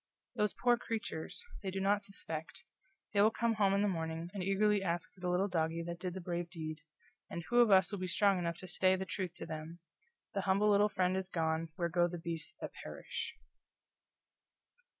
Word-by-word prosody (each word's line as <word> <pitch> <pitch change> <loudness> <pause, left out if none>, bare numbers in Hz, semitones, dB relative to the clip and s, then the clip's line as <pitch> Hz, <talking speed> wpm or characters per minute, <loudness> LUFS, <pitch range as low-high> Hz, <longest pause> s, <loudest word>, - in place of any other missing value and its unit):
"Those 210 -1 +1
poor 245 -1 +4
creatures! 225 - -4 0.2
They 195 - -3
do 190 +1 -3
not 200 +1 +3
suspect. 160 -6 -6 0.5
They 200 - +5
will 215 - +7
come 230 +1 +1
home 200 -2 +3
in 200 - +3
the - - +3
morning, 165 -1 -2
and 200 - -3
eagerly 200 +2 +3
ask 175 0 -1
for - - -21
the 180 0 -1
little 180 +3 +2
doggie 165 -2 0
that 170 0 -5
did 180 -1 -4
the - - -3
brave 175 -1 -3
deed, 155 -3 -5 0.5
and 170 - -4
who 240 - +5
of 240 -2 +7
us 190 -1 +6
will 200 - -3
be 185 - -2
strong 195 +1 +3
enough 170 -1 -2
to 185 - -8
say 185 +1 +3
the 190 0 -3
truth 185 -2 -3
to - - -6
them: 155 +2 -6 0.6
'The 195 - 0
humble 200 +2 +3
little 205 +1 +5
friend 185 -2 +1
is 190 0 -2
gone 160 -2 0
where 170 -1 0
go 175 +1 +3
the 175 0 -5
beasts 165 -1 -4
that - - -5
perish.'" - - -6
185 Hz, 210 wpm, -34 LUFS, 170-200 Hz, 0.6 s, will